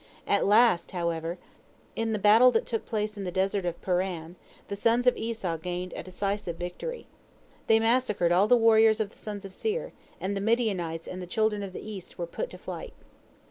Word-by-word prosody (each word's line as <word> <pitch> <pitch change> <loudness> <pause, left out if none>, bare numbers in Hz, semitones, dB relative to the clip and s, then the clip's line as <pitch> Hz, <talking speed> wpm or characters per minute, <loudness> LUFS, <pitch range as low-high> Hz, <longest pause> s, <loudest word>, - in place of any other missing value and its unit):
At - - +2
last, 210 -3 +4
however, 170 -1 -2 0.6
in 225 0 -1
the 215 - 0
battle 215 +5 +7
that 225 - +1
took 225 -2 -3
place 210 -1 -2
in 200 - -4
the 180 - -3
desert 190 +1 0
of 175 - -3
Paran, 180 -2 -2 0.3
the 200 - -4
sons 230 +4 +2
of 250 - +5
Esau 220 -7 -3
gained 180 +2 -4
a - - -4
decisive 195 -1 -3
victory. 180 - -5 0.6
They 225 0 +5
massacred 225 -6 +2
all 185 +4 +4
the 245 - +6
warriors 225 -1 +5
of 210 -2 -1
the - - -17
sons 205 -2 -6
of 195 - -9
Seir, 445 - -3 0.3
and 195 +2 -2
the 195 - -2
Midianites 195 -8 0
and 185 0 -6
the 180 - -7
children 215 0 0
of 195 -1 -5
the 185 - -8
East 200 -4 -8
were 175 - -2
put - - -5
to - - -10
flight. - - -7
200 Hz, 200 wpm, -28 LUFS, 180-225 Hz, 0.6 s, battle